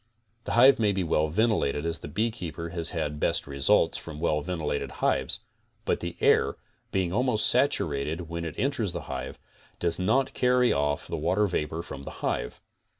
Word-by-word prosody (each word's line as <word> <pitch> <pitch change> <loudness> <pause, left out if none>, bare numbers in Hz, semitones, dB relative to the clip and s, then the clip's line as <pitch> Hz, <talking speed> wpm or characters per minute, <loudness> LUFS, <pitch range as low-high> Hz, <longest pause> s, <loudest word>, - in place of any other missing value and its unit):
The - - -3
hive 125 +3 +7
may 105 -2 +3
be 95 -1 0
well 80 -2 +1
ventilated 80 -6 +1
as 85 -1 -1
the - - -8
beekeeper 85 -3 -3
has 85 -1 0
had 75 -3 -3
best - - +2
results 70 -1 +2
from 75 -3 -9
well 75 -1 +1
ventilated 80 -3 -3
hives; - - 0 0.4
but - - +1
the 85 0 -5
air, - - +3 0.4
being 90 -2 0
almost 120 -1 +2
saturated 80 - +1
when 85 +1 -4
it 80 - -6
enters 120 -9 -1
the 85 - -4
hive, 65 -1 -6 0.4
does 85 0 0
not 115 +9 +1
carry 125 0 +3
off 70 0 0
the - - -3
water 90 +7 +1
vapor 80 -3 -2
from 70 -5 -8
the - - -7
hive. - - -2
85 Hz, 175 wpm, -27 LUFS, 75-105 Hz, 0.4 s, hive